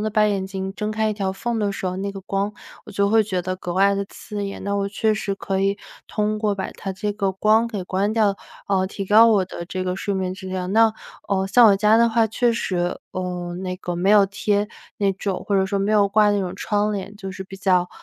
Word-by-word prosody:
地 215 - -1
把 215 0 +3
眼 200 -2 0
睛 190 0 -4
睁 210 0 -3
开 215 0 0
一 - - 0
条 195 -2 -2
缝 230 +4 -3
的 205 - +1
时 200 - -6
候， 180 - -2
那 200 +1 -2
个 195 - -8
光， 195 +1 -1 0.4
我 - - -9
就 200 0 +1
会 225 0 +5
觉 190 -3 -2
得 185 +1 -2
格 180 -1 -5
外 200 +1 +4
地 200 0 -1
刺 205 -1 -6
眼。 195 - -6
那 200 0 -1
我 200 0 0
确 215 +2 +1
实 205 -2 -2
可 195 -1 -2
以 195 +1 +1 0.3
通 215 0 -1
过 210 -1 0
把 190 -1 -4
它 195 - -5
这 205 +2 -3
个 200 -2 0
光 215 +4 +3
给 205 -5 -4
关 195 +4 0
掉， 215 -3 +2 0.3
呃， 190 -2 +2
提 195 0 -5
高 215 +4 +7
我 205 -4 +3
的 175 -1 -7
这 185 +1 -4
个 180 0 -1
睡 200 +1 -2
眠 185 -1 -1
质 190 0 -8
量。 185 0 -3
那， 225 +1 +5 0.4
呃， 190 -1 +1
像 230 +4 +6
我 200 - +5
家 210 +2 +4
的 235 - +5
话 225 0 +3
确 235 +2 +1
实， 180 -6 -1
呃， 180 -1 -4
那 185 -1 -3
个 180 -1 -4
没 175 +3 0
有 205 -1 +7
贴 205 +1 0 0.3
那 200 -1 +1
种 195 -1 -4
或 205 - 0
者 190 -1 +3
说 200 0 -1
没 200 +2 0
有 205 -2 +4
挂 210 +1 +4
那 205 -1 +1
种 185 -1 -3
窗 210 0 0
帘， 200 0 -5
就 195 -2 -6
是 190 - -6
比 195 0 -10
较， 185 -2 +2
200 Hz, 275 characters per minute, -22 LUFS, 190-210 Hz, 0.4 s, 高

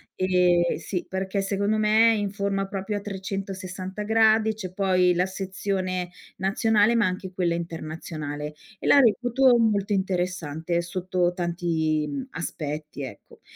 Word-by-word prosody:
ehm, 180 -2 +3
sì, 180 -3 -4
perché 190 +1 -2
secondo 200 +2 0
me 215 +2 +5
è - - +1
in 205 -2 -1
forma 200 -1 -1
proprio 195 +1 -3
a - - -5
360 190 -1 -5
gradi, 220 0 +4
c'è 190 -4 -7
poi 185 -2 +3
la 180 +1 +2
sezione 190 -1 -3 0.3
nazionale, 210 +3 +3
ma 230 -2 +3
anche 185 0 -3
quella 175 -2 0
internazionale, 155 -3 -5 0.3
e - - -4
la 285 - +7
reputo 245 +1 +4
molto 210 -2 +1
interessante, 175 -3 -1
sotto 180 0 -1
tanti, 165 -3 0
uhm, 270 -2 -4
aspetti 150 -3 -5
ecco. 130 - -11
190 Hz, 135 wpm, -25 LUFS, 175-205 Hz, 0.3 s, la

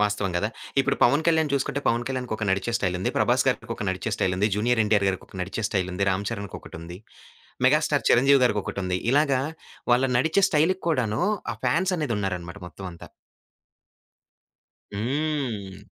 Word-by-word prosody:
వాస్తవం 105 -2 +1
గదా! 105 +5 0 0.3
ఇప్పుడు 135 0 0
'పవన్ 140 +6 +4
కళ్యాణ్' 160 -2 +3
చూసుకుంటే 140 +1 0
'పవన్ 120 +1 +2
కళ్యాణ్‌'కొక 125 -5 -3
నడిచే 95 +4 0
స్టైల్ 90 -5 -1
ఉంది. 95 - -1
'ప్రభాస్' - - +3
గారికి - - -1
ఒక - - -4
నడిచే 95 0 -2
స్టైల్ 90 - 0
ఉంది. 105 +3 +2
'జూనియర్ 115 +2 +1
ఎన్‌టి‌ఆర్' 105 -2 +2
గారికి 95 - -3
ఒక - - -13
నడిచే 95 +5 -3
స్టైల్ 95 -2 -1
ఉంది. 100 +2 0
'రామ్ 100 +2 -1
చరణ్'కొకటుంది. 90 -5 -7 0.7
'మెగాస్టార్ 145 -2 +2
చిరంజీవి' 135 +2 +5
గారికొకటుంది. 100 -4 -1
ఇలాగా 140 -3 +3 0.5
వాళ్ళ 125 +2 +4
నడిచే 160 +8 +2
స్టైల్‌కి 170 +5 +2
కూడాను 120 -9 0 0.3
ఆ - - -6
ఫాన్స్ 185 +3 +2
అనేదున్నారనమాట 100 - -3
మొత్తం 95 +1 -9
అంతా. 85 - -12 1.9
హ్మ్. 115 - -2
110 Hz, 150 wpm, -25 LUFS, 95-140 Hz, 1.9 s, చిరంజీవి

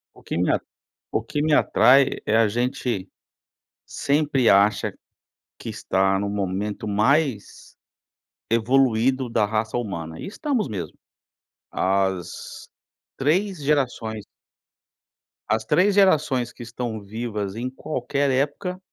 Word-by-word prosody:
O - - -18
que - - -4
me 90 - +2
a - - +2 0.5
o - - +1
que 145 +6 -3
me 155 0 +2
atrai 135 -1 +4
é 110 +1 +2
a 115 -2 +4
gente, 120 -3 -2 0.8
sempre 140 -3 +1
acha 100 +2 +3 0.6
que - - -8
está 95 +1 +1
no 100 - -2
momento 100 +2 -3
mais 115 +3 0 0.7
evoluído 125 +2 +2
da 110 -2 +2
raça 110 +2 -1
humana, 85 -8 -5
e - - -6
estamos 245 - -1
mesmo. 90 -8 -6 0.7
As 95 -2 -2 0.5
3 175 +4 0
gerações 125 -7 -1 1.2
as 110 0 0
3 195 - +3
gerações 150 - +3
que 120 - -10
estão 120 -2 -5
vivas 105 -1 -4
em 125 +3 -3
qualquer 140 +1 -2
época, 145 +8 -1
120 Hz, 115 wpm, -23 LUFS, 105-140 Hz, 1.2 s, atrai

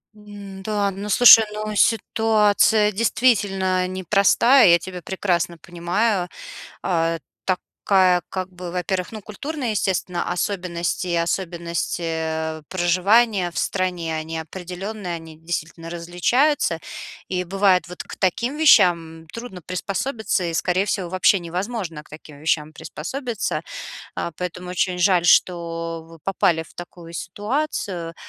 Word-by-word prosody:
М-да, 205 0 -4
ну, 200 +2 -6
слушай, 225 +1 +9
ну, 215 0 -4
ситуация, 215 -1 +3
действительно, 195 -4 +1
непростая, 200 +7 +4
я 170 - +6
тебя 180 0 -8
прекрасно 175 -2 -1
понимаю. 175 +4 -1 0.5
А 165 -2 +1 0.3
такая, 185 -1 +2
как 185 0 -4
бы 180 0 -7
во-первых, 180 +1 -2
ну, 220 - -6
культурные, 255 +4 -4
естественно, 180 -3 -1
особенности 175 -1 -2
особенности, 170 0 -2
э, 160 -1 -3
проживания 185 +2 +3
в - - -10
стране, 180 -4 -1
они 160 +1 -4
определенные, 180 +3 -6
они 160 -1 -10
действительно 165 0 -5
различаются. 175 - +1 0.5
И, 180 -1 -1
бывает, 190 0 +2
вот 180 - -7
к - - -10
таким 235 - 0
вещам 170 - +4
трудно 230 -7 -8
приспособиться, 200 - -2
и, 170 - -2
скорее 185 +2 +1
всего, 190 -4 -2
вообще 185 +1 +3
невозможно 175 -2 -4
к - - -23
таким 150 -1 -12
вещам 155 0 0
приспособиться. 235 - -4 0.5
А, 170 - -3
поэтому 180 +1 -5
очень 180 0 0
жаль, 180 -1 +3
что 165 -1 +1
вы 165 - -13
попали 175 -4 +1
в - - -19
такую 175 -1 -10
ситуацию. 195 - -3
180 Hz, 120 wpm, -22 LUFS, 170-205 Hz, 0.5 s, слушай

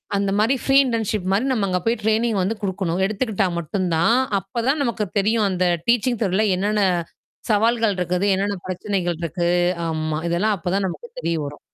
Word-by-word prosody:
அந்த 200 0 0
மாரி 225 +6 +3
free 270 - +2
internship 220 -5 -1
மாரி 205 +6 +2
நம்ம 220 -6 +1
அங்க 180 -1 0
போய் 230 0 +1
ட்ரெய்னிங் 220 0 +1
வந்து 195 +5 0
குடுக்கணும். 190 -2 -2
எடுத்துக்கிட்டா 215 -1 0
மட்டும் 185 +3 -2
தான், 195 +9 +3 0.2
அப்ப 195 +5 -5
தான் 285 +2 +2
நமக்கு 235 -4 -1
தெரியும். 215 +1 +2
அந்த 185 -1 0 0.2
டீச்சிங் 240 0 +2
துறையில 200 +2 +1
என்னென்ன 205 +2 +1 0.7
சவால்கள் 225 -1 +2
இருக்குது. 180 +2 0
என்னென்ன 200 +1 -1
பிரச்சனைகள் 185 -2 -2
இருக்கு 170 +1 -1 0.4
ஆமா. 155 -1 -2
இதெல்லாம் 205 +5 +1
அப்ப 175 0 -4
தான் 200 0 +1
நமக்கு 190 - -7
தெரிய 170 - -1
வரும். 145 +1 -8
200 Hz, 175 wpm, -22 LUFS, 180-225 Hz, 0.7 s, மாரி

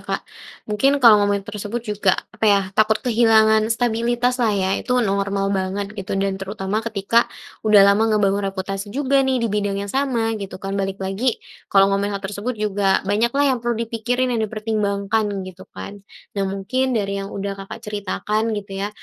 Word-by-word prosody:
Kak. - - -4 0.4
Mungkin 270 +7 +2
kalau 215 -3 +8
ngomongin 205 -1 +1
tersebut 220 +3 -5
juga, 210 -3 +1 0.2
apa - - -4
ya, 200 -1 +5
takut 215 +1 +3
kehilangan 220 -2 +4
stabilitaslah 240 -1 +1
ya. 190 -1 0
Itu 250 -2 +1
normal 200 0 0
banget 195 +1 -2
gitu 195 -2 -4
dan 195 0 -1
terutama 195 +1 -3
ketika 225 +1 +1 0.3
udah 210 -2 +6
lama 205 +3 +4
ngebangun 200 -1 +1
reputasi 195 +1 -5
juga 275 +4 +1
nih 265 -1 +1
dibidang 205 -2 -1
yang 200 - -7
sama 255 -5 0
gitu 195 -1 -6
kan, 195 +1 -5
balik 195 0 -2
lagi 195 +6 -1 0.3
kalau 195 0 +4
ngomongin 200 0 0
hal 195 - -9
tersebut 210 +5 -4
juga 200 -2 +1
banyaklah 235 +8 +1
yang 255 - -1
perlu 240 -1 -1
dipikirin, 245 +3 -1
yang 230 - 0
dipertimbangkan 215 -1 -1 0.2
gitu 185 0 -11
kan. 200 0 -9 0.3
Nah, 200 - 0
mungkin 245 +6 -1
dari 200 -1 -1
yang 195 - -5
udah 200 0 -4
Kakak 195 +4 -9
ceritakan 210 +2 -2
gitu 195 -1 -6
ya, 200 - -1
210 Hz, 170 wpm, -21 LUFS, 195-230 Hz, 0.4 s, kalau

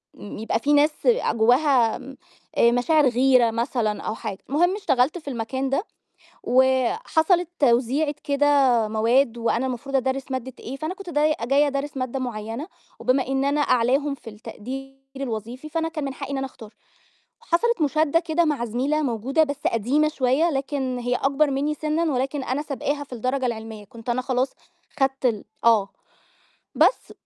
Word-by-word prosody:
امم، 205 - -9
يبقى 225 +1 -1
في 290 +5 +1
ناس 295 +1 +2
آآ، - - +3
جوّاها 245 0 +3
م 265 +1 -11 0.4
آآ، 235 - +5
مشاعر 280 +5 +3
غيرة 250 -1 +4
مثلًا 230 -2 -1
أو 215 - -3
حاجة. 215 -4 -5
المهم 350 +7 +2
اشتغلت 300 -7 +1
في 310 - -13
المكان 260 +2 -3
ده، 275 +7 0 0.6
وحصلت 315 - +2
توزيعة 270 +4 +2
كده 285 0 +1 0.4
مواد 230 +3 +2
وأنا 235 +2 0
المفروض 260 +2 -4
أدرِّس 265 +1 -1
مادة 260 0 -4
إيه، 260 - -6
فأنا 310 +5 -3
كنت 390 -2 -9
داي 305 -1 +2
جاية 275 +5 +3
أدرِّس 280 +1 -3
مادة 255 0 -3
معيّنة، 230 +3 -5 0.3
وبما 255 0 +1
إن 270 0 0
أنا 285 +1 +1
أعلاهم 275 +2 +2
في 245 - -11
التقدير 255 +5 -8 0.2
الوظيفي، 245 +2 -5
فأنا 325 +1 -1
كان 320 -2 -5
من 275 - -4
حقي 275 0 -7
إن 275 - -2
أنا 270 0 -2
أختار. 225 -4 -14 0.7
وحصلت 470 -1 +1
مُشادّة 310 +2 +2
كده 335 0 0
مع 290 -6 0
زميلة 265 +7 0
موجودة 260 +5 +1
بس 285 -2 -3
قديمة 255 +7 +1
شوية 290 +3 +1
لكن 270 -2 -2
هي 245 +1 -1
أكبر 280 +3 +1
منّي 285 +3 0
سِنًّا، 310 +2 -1
ولكن 265 +2 -1
أنا 260 +3 -2
سبقاها 285 0 -3
في 265 - -11
الدرجة 255 +3 -1
العلمية، 220 -2 -6
كنت 230 +4 -10
أنا 240 +1 +1
خلاص 255 0 0 0.5
خدت 270 -1 0
ال 215 -4 -2 0.2
آه. 215 -4 +4 0.9
بس - - +2
270 Hz, 165 wpm, -23 LUFS, 240-295 Hz, 0.9 s, آآ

